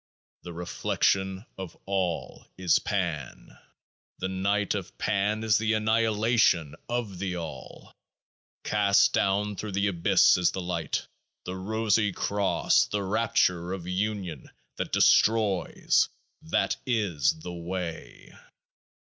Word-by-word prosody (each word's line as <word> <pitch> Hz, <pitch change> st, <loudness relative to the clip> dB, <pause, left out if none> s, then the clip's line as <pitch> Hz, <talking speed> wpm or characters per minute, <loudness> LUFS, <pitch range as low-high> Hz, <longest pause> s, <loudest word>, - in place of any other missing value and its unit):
The 90 Hz, -, -8 dB
reflection 95 Hz, +3 st, -1 dB
of 95 Hz, -3 st, -7 dB
All 95 Hz, -3 st, -2 dB
is 90 Hz, -3 st, +3 dB
Pan: 85 Hz, -7 st, -4 dB, 0.6 s
the 95 Hz, -, -3 dB
Night 100 Hz, +2 st, 0 dB
of 100 Hz, -2 st, -6 dB
Pan 105 Hz, +1 st, 0 dB
is 110 Hz, -1 st, +3 dB
the 110 Hz, 0 st, +1 dB
Annihilation 110 Hz, -6 st, +2 dB, 0.2 s
of 115 Hz, -6 st, -3 dB
the 90 Hz, -2 st, -3 dB
All. 75 Hz, -6 st, -9 dB, 0.7 s
Cast 100 Hz, -1 st, +3 dB
down 100 Hz, +1 st, +1 dB
through 105 Hz, +1 st, -6 dB
The 100 Hz, +1 st, +1 dB
Abyss 85 Hz, -3 st, +4 dB
is 90 Hz, -1 st, +3 dB
the -, -, -3 dB
Light, 85 Hz, -4 st, -2 dB, 0.4 s
the 90 Hz, -, -5 dB
Rosy 110 Hz, +2 st, +1 dB
Cross, 100 Hz, +1 st, +1 dB
the 105 Hz, -1 st, -2 dB
rapture 95 Hz, -4 st, +1 dB
of 90 Hz, -3 st, -6 dB
Union 95 Hz, -5 st, -3 dB, 0.3 s
that -, -, -3 dB
destroys, 105 Hz, -4 st, +3 dB, 0.3 s
that -, -, 0 dB
is 95 Hz, -, +1 dB
The 90 Hz, +1 st, -6 dB
Way. 85 Hz, -5 st, -6 dB
95 Hz, 115 wpm, -27 LUFS, 90-105 Hz, 0.7 s, Abyss